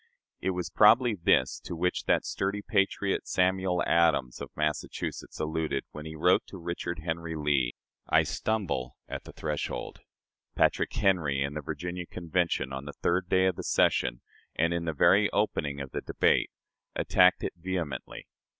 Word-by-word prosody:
It 95 - -1
was 90 -2 -3
probably 115 +3 +6
this 85 -8 +2
to - - -7
which 90 +2 -1
that - - +2
sturdy 100 +1 -2
patriot, 100 -1 0
Samuel 90 -1 +1
Adams, 80 -7 +2
of - - -6
Massachusetts, 75 0 -3
alluded, 80 -3 -1
when 75 +1 -8
he 80 - -7
wrote 90 +4 +4
to 95 - -9
Richard 85 -1 -4
Henry 80 0 -3
Lee, 70 -5 +1 0.3
"I - - +5
stumble 95 - -2
at - - -6
the - - -9
threshold." 75 -2 -4 0.6
Patrick - - +2
Henry, 75 -8 +1
in 70 +1 -3
the 75 - -4
Virginia 90 +4 -5
Convention, 85 -6 -1
on 65 +1 -5
the 75 - -7
third 90 +1 +1
day 95 0 +4
of 95 -2 +1
the - - -5
session, - - +2 0.3
and 85 +2 +2
in 85 -1 -2
the 80 - -1
very 75 - +4
opening 70 -1 -1
of 70 -1 -6
the - - -3
debate, - - +2 0.5
attacked 90 0 +4
it - - -2
vehemently. 85 -6 -4
85 Hz, 160 wpm, -29 LUFS, 75-90 Hz, 0.6 s, probably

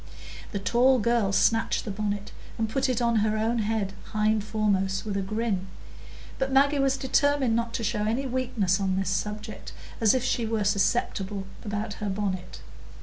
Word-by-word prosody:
The 205 - -2
tall 240 +7 +3
girl 235 -3 +2
snatched 225 +3 +2
the 215 - -3
bonnet 205 0 -3 0.3
and 225 -1 0
put 265 +4 0
it 245 -1 0
on 235 -1 +2
her 215 0 +1
own 225 +2 +1
head 210 -2 -1 0.2
hind 215 0 +2
foremost 200 -3 0
with 205 -2 -3
a 200 - 0
grin; 200 -1 -2 0.7
but 265 0 0
Maggie 280 +2 +4
was 270 0 +2
determined 270 -2 +2
not 230 0 -1
to 230 - -2
show 210 -1 0
any 235 +6 0
weakness 235 -7 0
on 190 -1 0
this 195 - 0
subject, 210 +1 -4 0.3
as 225 +1 +4
if 255 - 0
she 235 -3 0
were 220 -1 0
susceptible 200 -1 0 0.2
about 210 0 -3
her 210 - -1
bonnet. 190 -2 -3
215 Hz, 175 wpm, -27 LUFS, 200-235 Hz, 0.7 s, Maggie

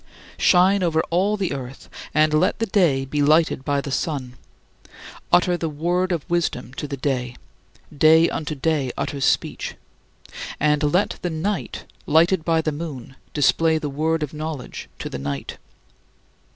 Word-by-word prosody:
Shine 185 +2 +4
over 160 -3 +2
all 195 +5 +2
the 190 -6 -1
earth, 135 -1 -8 0.2
and 155 +1 +3
let 155 - +2
the 225 - 0
day 170 -10 +2
be 145 +2 -2
lighted 155 -1 +3
by 140 0 0
the 140 - -6
sun, 135 -4 -2 1.0
utter 175 0 +4
the 165 -2 -2
Word 175 +5 0
of 165 -4 -2
wisdom 165 -7 -1
to 150 - -4
the 140 -1 -5
day 125 -2 -2 0.6
("day 160 +3 +6
unto 155 -1 -3
day 140 -2 0
utters 140 -2 -2
speech") - - 0 0.8
and 150 0 +2
let 165 +7 +1
the 175 - -2
night, 175 +5 -3 0.2
lighted 165 +3 +4
by 165 0 +2
the 155 - -1
moon, 145 -5 -7 0.2
display 160 +2 +3
the 150 -2 -3
Word 160 +2 0
of 150 - -5
knowledge 155 -3 -6
to - - -5
the 70 - -6
night. 70 0 -5
155 Hz, 155 wpm, -22 LUFS, 140-170 Hz, 1.0 s, day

